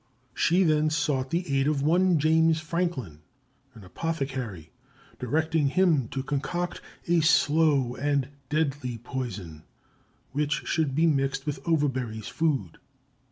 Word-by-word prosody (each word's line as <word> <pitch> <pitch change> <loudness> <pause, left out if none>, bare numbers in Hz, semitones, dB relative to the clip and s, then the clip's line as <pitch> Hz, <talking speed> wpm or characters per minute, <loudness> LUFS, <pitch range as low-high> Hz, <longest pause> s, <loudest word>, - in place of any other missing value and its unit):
She 180 +3 +3
then 155 -2 +3
sought 150 -4 0
the 175 +4 -1
aid 135 - +1
of 145 -2 +1
one 175 +3 +3
James 160 +1 +3
Franklin, 155 - -3 0.6
an 110 - -12
apothecary, 130 - -4 0.5
directing 155 +4 +1
him 160 -5 +2
to 135 +3 -4
concoct 165 +5 -3 0.3
a 170 0 +3
slow 150 -5 +3
and 140 -1 0 0.2
deadly 145 -5 -1
poison, 110 - -6 0.7
which 145 +1 -1
should 155 -5 0
be 160 +3 +3
mixed 135 -3 +1
with 145 -2 -3
Overbury's 130 -9 -1
food. 140 - -1
145 Hz, 120 wpm, -27 LUFS, 130-160 Hz, 0.7 s, She